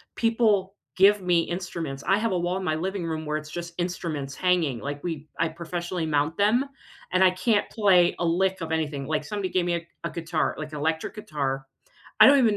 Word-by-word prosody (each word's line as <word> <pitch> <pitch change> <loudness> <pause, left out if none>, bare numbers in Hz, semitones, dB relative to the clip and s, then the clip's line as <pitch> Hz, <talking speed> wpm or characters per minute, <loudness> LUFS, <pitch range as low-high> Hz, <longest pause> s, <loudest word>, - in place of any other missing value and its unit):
people 215 -4 +2 0.2
give 200 +1 +5
me 175 -2 +3
instruments. 170 -6 -4
I 195 - +4
have 225 +2 0
a 180 - +1
wall 175 +2 -1
in 190 - -4
my 155 -3 0
living 185 +2 -3
room 160 -1 -3
where 150 0 -2
it's 155 0 -8
just 170 0 -6
instruments 160 -6 -3
hanging. 170 -9 +1
Like, 145 +2 -5
we 155 -3 -4
I 165 -1 +2
professionally 170 +1 -4
mount 150 +1 0
them 220 +6 +3 0.5
and 185 +1 +2
I 185 - +6
can't 205 +3 +1
play 190 -6 +4
a 175 - 0
lick 185 +3 +1
of 165 -1 -4
anything. 150 -4 -1
Like 155 0 -1
somebody 195 +2 -3
gave 180 -2 +1
me 175 -1 +1
a 170 0 -5 0.2
a - - -1
guitar- 165 -1 -1
like 155 0 -6
electric 160 +6 -2
guitar. 140 -9 -3 0.6
I - - +11
don't 280 0 +7
even 225 -5 +4
175 Hz, 210 wpm, -26 LUFS, 155-190 Hz, 0.6 s, I